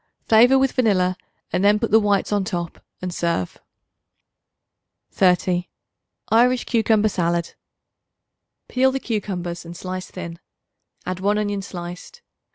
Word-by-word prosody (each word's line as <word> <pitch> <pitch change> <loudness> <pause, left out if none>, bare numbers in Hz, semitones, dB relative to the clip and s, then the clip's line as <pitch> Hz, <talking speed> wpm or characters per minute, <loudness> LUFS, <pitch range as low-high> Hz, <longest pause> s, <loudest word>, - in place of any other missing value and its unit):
Flavor 240 +4 +6
with 265 -1 +2
vanilla 185 -7 +2 0.4
and 180 +2 +1
then 205 +1 +5
put 230 0 -2
the 220 - +7
whites 205 -2 +1
on 205 -1 +1
top 175 -4 -5 0.2
and 180 -1 -3
serve. 170 - -2 1.5
30. 180 -1 +2 0.6
Irish 245 +3 +4
Cucumber 220 -2 +2
Salad. 170 -3 -1 1.1
Peel 265 +1 +2
the 270 - -2
cucumbers 185 -7 -4
and 170 0 -9
slice 185 0 -6
thin; 170 -2 -8 0.7
add 185 0 -3
1 205 +2 +1
onion 205 -1 -1
sliced. 180 - -9
195 Hz, 125 wpm, -22 LUFS, 175-220 Hz, 1.5 s, the